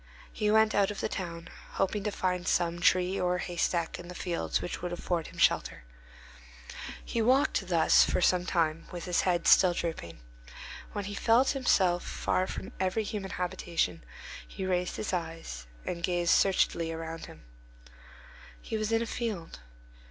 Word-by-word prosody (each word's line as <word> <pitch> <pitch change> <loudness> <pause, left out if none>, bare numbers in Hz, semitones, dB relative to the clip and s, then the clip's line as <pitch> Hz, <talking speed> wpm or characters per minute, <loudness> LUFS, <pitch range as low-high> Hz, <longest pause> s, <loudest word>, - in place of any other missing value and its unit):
He 210 -1 0
went 220 0 +4
out 200 -1 +3
of 210 - -5
the - - -1
town, 170 -2 -5 0.3
hoping 195 +1 0
to 210 - 0
find 180 -2 -1
some 175 -1 +1
tree 185 +1 +3
or 180 0 +1
haystack 170 -2 -1
in 175 - -9
the 180 - -9
fields 175 -2 -1
which - - -5
would 175 0 -3
afford 175 -1 -2
him - - -13
shelter. - - +2 1.2
He 230 - -1
walked 255 -4 +2
thus 170 -3 +5
for - - 0
some 180 0 +3
time, 165 -2 0
with 175 -1 -6
his 180 -1 +1
head 175 -2 0
still 185 -2 +6
drooping. 160 - -4 0.8
When 205 -1 -3
he 205 - -5
felt 230 +5 +3
himself 190 -10 +2
far 185 - -1
from - - -6
every 190 +4 0
human 205 -2 -4
habitation, 175 - -2 0.4
he 190 - -6
raised 180 -1 0
his 210 - -3
eyes 165 - -5 0.2
and 170 - -4
gazed 175 0 +1
searchingly 170 -3 +2
about 165 0 -6
him. - - -14 1.2
He 220 - -4
was 215 0 -2
in 225 0 +2
a - - -3
field. 215 - -4
180 Hz, 165 wpm, -29 LUFS, 170-200 Hz, 1.2 s, still